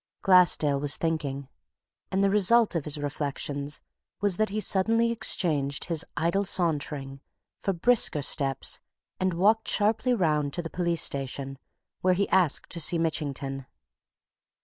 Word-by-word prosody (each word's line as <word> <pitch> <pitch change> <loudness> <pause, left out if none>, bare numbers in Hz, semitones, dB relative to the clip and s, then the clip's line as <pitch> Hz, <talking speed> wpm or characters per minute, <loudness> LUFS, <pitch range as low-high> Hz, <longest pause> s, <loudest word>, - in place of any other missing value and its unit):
Glassdale 175 -6 +4
was 145 0 +2
thinking. 145 -4 -3 0.6
And 195 +1 +1
the 195 - +2
result 210 +3 +3
of 165 -4 -2
his 150 -1 -3
reflections 145 0 -4 0.4
was 200 -3 +1
that 215 0 +1
he 210 +2 -3
suddenly 225 +4 +2
exchanged 150 -11 +1
his 165 -1 -1
idle 170 +6 +1
sauntering 145 -7 -2 0.4
for 195 - -1
brisker 190 -5 +2
steps 135 -1 0 0.4
and 185 -2 0
walked 215 +5 +2
sharply 220 +4 +1
round 150 -7 0
to 175 - -2
the 165 - -7
police 170 -2 0
station, 135 0 -3 0.4
where 185 0 +2
he 200 +2 0
asked 180 -6 +1
to 170 - -5
see 170 +3 +4
Mitchington. 140 -4 -3
165 Hz, 140 wpm, -26 LUFS, 145-195 Hz, 0.6 s, Glassdale